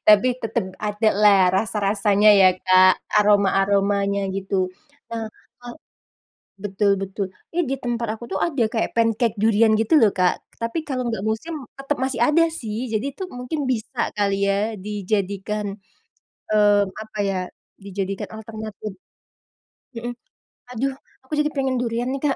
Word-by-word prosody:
Tapi, 215 +4 +7
tetep 225 -3 -1
adalah, 210 -3 +3
rasa-rasanya 205 0 +3
ya, 190 -2 +7
Kak? 185 0 +6 0.2
Aroma-aromanya, 200 -1 +2
gitu. 190 -1 -1 0.4
Nah, 225 -1 -3 0.4
eee 240 - -7 0.8
betul 200 +1 0
betul. 195 +1 -3 0.2
Iya 350 +1 0
di 270 - -1
tempat 240 -1 -2
aku 225 - -10
tuh, 190 - -1
ada 285 -7 -1
kayak 225 - -1
pancake 230 0 +1
durian 220 +1 +4
gitu 225 +8 +4
loh, 220 -6 +5
Kak. 180 -1 +3 0.3
Tapi 230 +8 -3
kalo 260 -3 -2
nggak 220 -3 -3
musim, 220 +10 -2 0.2
tetep 275 +2 -2
masih 260 -2 -2
ada 300 +6 +4 0.2
sih. 225 +2 -4
Jadi 215 +4 -1
tuh, 380 - -3
mungkin 250 +5 -3
bisa 250 0 -3 0.2
kali 200 -1 +1
ya 205 +3 0
dijadikan, 205 +1 -2 0.8
mmm, 205 -1 +4 0.2
apa 215 -1 -9
ya? 195 -1 -1 0.4
Dijadikan 195 0 -4
alternatif. 215 -1 -7 1.0
Heeh. 240 +1 -4 0.6
Aduh! 265 +3 -1 0.3
Aku 260 - -11
jadi 300 0 +2
pengen 265 -2 0
durian 240 +1 -1
nih, 275 0 -3
Kak. 275 - +1
215 Hz, 140 wpm, -22 LUFS, 200-240 Hz, 1.0 s, Tapi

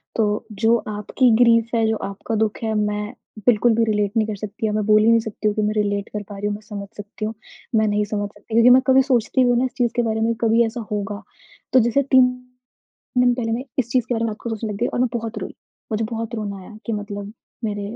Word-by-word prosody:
तो 210 0 0 0.2
जो 230 +1 +5
आपकी 215 +4 +1
ग्रीफ़ 230 0 +3
है, 225 -1 +3
जो 220 - +1
आपका 200 +3 -4
दुःख 215 -1 0
है 220 -1 0
मैं 210 +1 -1 0.3
बिल्कुल 235 0 +4
भी 230 - +3
रिलेट 210 -2 +1
नहीं 215 -1 +2
कर 215 - -3
सकती। 215 +2 -5
या - - -1
मैं 210 -1 0
बोल 215 0 +5
ही - - +3
नहीं 230 0 +5
सकती 220 -1 -3
हूँ 210 - +1
कि 215 - 0
मैं 210 0 +1
रिलेट 205 -1 -2
कर 210 -1 -5
पा 205 - -7
रही 205 - -4
हूँ, 205 - -1
मैं 210 - -10
समझ 200 -2 -7
सकती 205 +1 -6
हूँ, 220 - -3 0.4
मैं 215 0 +3
नहीं 210 0 +1
समझ 205 -1 -3
सकती 220 - -14
हूँ। 230 - +5
लेकिन 250 +1 +8
मैं 260 - +6
कभी 265 0 +6
सोचती 255 -1 +2
भी 245 - +3
हूँ 240 - +3
ना 260 - +2
इस 255 - -4
चीज़ 240 -2 +1
के 240 - +3
बारे 220 -1 -1
में 230 +1 +2
कभी 230 +1 +4
ऐसा 225 +1 -4
होगा। 205 0 -3 0.5
तो 260 - +7
जैसे 240 +4 +2
3 260 -1 +7 0.9
दिन 245 -1 +4
पहले 225 -2 -2
मैं 240 +3 -1 0.2
इस 240 -2 0
चीज़ 250 -3 +2
के 245 - 0
बारे 230 0 -1
में 225 - 0
रात 210 - -6
को 235 - -4
सोचने 220 0 -3
लग - - -6
गई 240 - +1
और - - -3
मैं 250 - +3
बहुत 230 -1 -4
रोई। - - -7 0.4
मुझे 215 +1 0
बहुत 225 0 -4
रोना 205 -3 -4
आया 210 +3 -12
कि 230 - -2
मतलब 205 0 -5 0.3
मेरे 205 -1 -2
220 Hz, 270 wpm, -21 LUFS, 210-235 Hz, 0.9 s, लेकिन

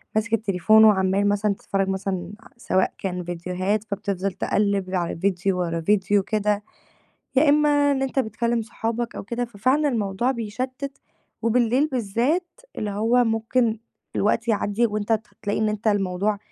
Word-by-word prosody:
ماسك 220 +1 0
التليفون 215 0 +4
وعَمّال 195 -1 +3
مثلًا 205 0 +1
تتفرّج 195 0 -2
مثلًا 190 -1 -3
ع - - -16
سواء 190 -5 0
كان 180 -2 -3
فيديوهات 180 +4 -2
فبتفضل 200 -2 -3
تقلّب 195 -1 0
على 175 -2 -1
فيديو 185 0 0
ورا 165 -2 -1
فيديو 200 +2 +2
كده، 210 0 0 0.7
يا 290 +3 +5
إمّا 290 -1 +4
إن 270 - -1
أنت 270 0 -2
بتكلّم 235 -1 0
صحابك 230 +1 -3
أو - - -5
كده، 235 +4 -3
ففعلًا 255 +7 +1
الموضوع 220 -1 0
بيشتِّت 255 +4 -4 0.4
وبالليل 240 +4 +2
بالذات 260 - -1 0.2
اللي 210 -1 -2
هو 230 +5 +2
ممكن 225 0 +1 0.4
الوقت 220 +3 +1
يعدّي 215 +1 +1
وأنت 210 0 -2
ت 220 +1 0
هتلاقي 205 0 -3
إن 215 0 +1
أنت 210 +1 -4
الموضوع 200 0 +1
215 Hz, 150 wpm, -23 LUFS, 195-235 Hz, 0.7 s, يا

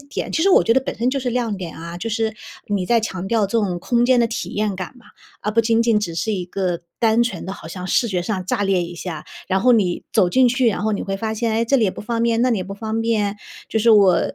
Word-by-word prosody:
点， 280 0 -5
其 320 - +1
实 390 - +4
我 - - +5
觉 230 - +3
得 265 - +4
本 - - -5
身 240 +2 +1
就 270 +1 -1
是 250 -1 -2
亮 230 -4 -1
点 180 -3 -7
啊。 170 +1 -7
就 225 +5 -4
是 225 -1 -1 0.3
你 200 -3 -1
在 235 +4 +3
强 190 -4 -4
调 220 -2 +2
这 - - -11
种 185 -4 -1
空 240 +6 +1
间 255 0 +4
的 235 - +4
体 230 0 -4
验 210 -1 -1
感 185 +6 -6
嘛， 245 - -20 0.3
而 210 - -2
不 230 - +4
仅 225 0 +2
仅 230 -2 +3
只 170 -5 -3
是 220 +5 -1
一 185 -3 -2
个 180 -1 -2 0.2
单 225 0 +3
纯 210 -8 -3
的 190 - -4
好 195 - -10
像 180 +1 -6
视 235 +4 +2
觉 180 -3 -1
上 185 0 -3
炸 205 +1 -1
裂 190 -2 +2
一 175 +1 -6
下， 165 -3 -6 0.2
然 190 0 +1
后 250 +1 +5
你 190 -6 +1
走 180 - +4
进 255 +6 +4
去， 250 +1 +1
然 215 -2 +1
后 220 0 0
你 205 - -2
会 195 0 -3
发 220 +2 -3
现： 225 0 -1
“哎， 230 - +1
这 275 +4 +2
里 230 - +3
也 195 - +2
不 - - -9
方 230 +1 -2
便， 230 -1 +2
那 255 - +3
里 225 - +1
也 185 - -3
不 195 +1 -7
方 220 +1 -3
便。” 215 -3 0 0.3
就 220 - +1
是 225 +2 +2
我 200 -5 +6
220 Hz, 320 characters per minute, -21 LUFS, 190-235 Hz, 0.3 s, 我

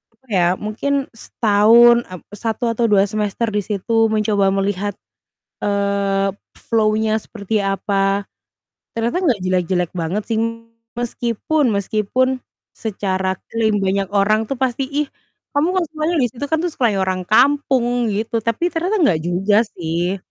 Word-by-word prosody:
apa 260 +3 -34
ya, 175 -3 +3
mungkin 270 +6 -2
setahun, 230 +2 +5
eee, 185 -2 -9
1 230 +2 -2
atau 235 +1 0
2 200 -1 +5
semester 215 +1 -1
di 210 - +1
situ 225 +2 +1
mencoba 210 -2 +2
melihat, 200 0 -1 0.7
eee, 200 -1 0 0.3
flow-nya 220 -1 +1
seperti, 215 0 -3
apa, 195 0 0 0.7
ternyata 235 +9 0
nggak 250 - +2
jelek-jelek 180 -1 0
banget 175 +5 -2
sih. 225 - +1 0.6
Meskipun 240 +3 0
meskipun 220 +6 0 0.3
secara 190 -3 -2
klaim 220 -2 +1
banyak 195 0 0
orang 215 +2 +3
tuh 275 - -1
pasti, 260 +1 0
"Ih, 295 0 0 0.5
kamu 305 +5 +2
kan 370 - +2
semuanya 315 +2 -1
di 245 - +3
situ, 255 +3 -8
kan 320 - +3
tuh 355 - 0
seperti 230 -8 +1
orang 185 -1 -1
kampung!" 245 -1 +2
Gitu, 225 +3 -1
tapi 230 +10 0
ternyata 365 +6 0
nggak 165 - +3
juga 195 +5 +2
sih, 175 +3 -2
215 Hz, 140 wpm, -19 LUFS, 195-240 Hz, 0.7 s, setahun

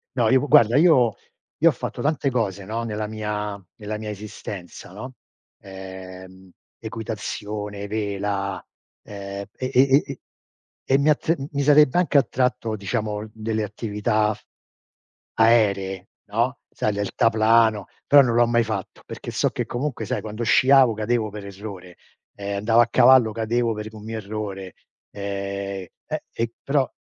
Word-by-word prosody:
No, 115 -3 +2
io 130 +1 +4
u 145 - -2
guarda 125 -4 +6
io 140 -9 +5 0.4
io - - +5
ho - - +3
fatto - - -6
tante 145 -1 0
cose, 100 -6 -2
no, 115 +3 -3
nella 105 -2 -3
mia 105 -1 -4 0.2
nella 105 -1 -5
mia 110 0 -6
esistenza 100 -4 -8
no: 125 +7 -9 0.4
ehm, 95 -1 -11 0.3
equitazione, 105 -2 -5
vela, 100 -2 -2 0.4
ehm, 100 -1 -7
e 130 0 -3
e 125 - +6
e 135 +2 +5
e - - -8 0.7
e 135 - +3
mi 145 +2 +3
a 150 - +6
t 160 - 0
n 140 -3 -6
mi 140 -1 -1
sarebbe 150 +1 +5
anche 160 -5 +4
attratto, 125 -3 0
diciamo, 105 +1 -3
delle 110 0 -2
attività 105 0 -1 1.0
aeree 100 -5 +2 0.2
no: 120 +6 -1
sai, 105 - -1
deltaplano; 110 +1 +2 0.2
però 145 0 +8
non 120 -3 +1
l'ho 120 0 +5
mai 120 0 +3
fatto 105 -4 -5
perché - - -7
so - - +1
che - - -3
comunque 120 -2 -3
sai 105 - -2
quando 110 +2 -5
sciavo 130 +1 +5
cadevo 110 +1 -1
per 105 -1 -8
errore, 95 -3 -9 0.4
ehm, 100 0 -4
andavo 115 +3 +4
a 120 - +3
cavallo 120 -2 +6
cadevo 115 +1 0
per 105 0 -6
un 110 -1 -11
mio 110 +1 -5
errore, 100 -3 -6 0.4
ehm, 100 -1 -4 0.2
eh, - - -4
e 115 0 -3
però 140 -1 +1
110 Hz, 155 wpm, -23 LUFS, 100-120 Hz, 1.0 s, però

